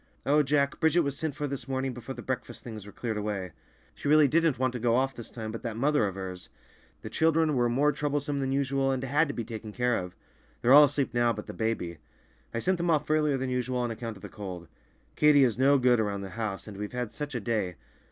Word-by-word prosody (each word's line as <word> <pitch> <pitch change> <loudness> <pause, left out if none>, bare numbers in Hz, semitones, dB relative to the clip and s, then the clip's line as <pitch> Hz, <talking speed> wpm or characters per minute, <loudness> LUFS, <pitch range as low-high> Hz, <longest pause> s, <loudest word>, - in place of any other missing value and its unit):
Oh, 150 +2 +4
Jack, 140 0 +1
Bridget 160 +2 +4
was 140 -3 -2
sent 155 -1 -3
for 150 - -3
this 140 -1 -5
morning 130 -1 -2
before 120 +2 -7
the - - -8
breakfast 130 -1 -4
things 110 -4 -8
were - - -9
cleared 110 +1 -4
away. 100 -3 -3 0.4
She - - -6
really 150 0 +6
didn't 165 -2 +2
want 130 0 0
to 125 - -4
go 115 0 +2
off 135 +1 +1
this 120 -2 -9
time, 110 -2 -6
but 115 - -6
that 115 -2 -4
mother 140 -3 +2
of 95 - -5
hers—! 95 -1 -7 0.5
The 110 - -5
children 160 +3 +2
were 120 -2 +2
more 140 +5 +3
troublesome 145 -1 -2
than 135 -1 -1
usual, 135 0 +1
and 135 -1 -1
had 145 +4 +2
to 145 - -4
be 115 - -3
taken 110 -1 -7
care 125 +2 +1
of. 90 0 -7 0.5
They're 125 - +6
all 150 +1 +10
asleep 140 -3 0
now 120 -1 +3
but - - -7
the - - -8
baby. 100 -8 -2 0.5
I - - -4
sent 185 +10 +1
them 175 0 0
off 150 -2 +1
earlier 150 -3 +2
than 130 0 -2
usual 125 0 -1
on 120 -1 -1
account 115 -1 -6
of - - -17
the - - -5
cold. 95 -5 -8 0.5
Katy 150 -2 +6
is 120 -2 +1
no 140 +2 +5
good 125 -2 +4
around 100 -2 -1
the 95 - -6
house, 110 -4 -4
and 105 -2 -8
we've 105 +2 -5
had 125 -3 -3
such 145 -2 -5
a - - 0
day! 105 -5 -1
125 Hz, 250 wpm, -28 LUFS, 110-145 Hz, 0.5 s, all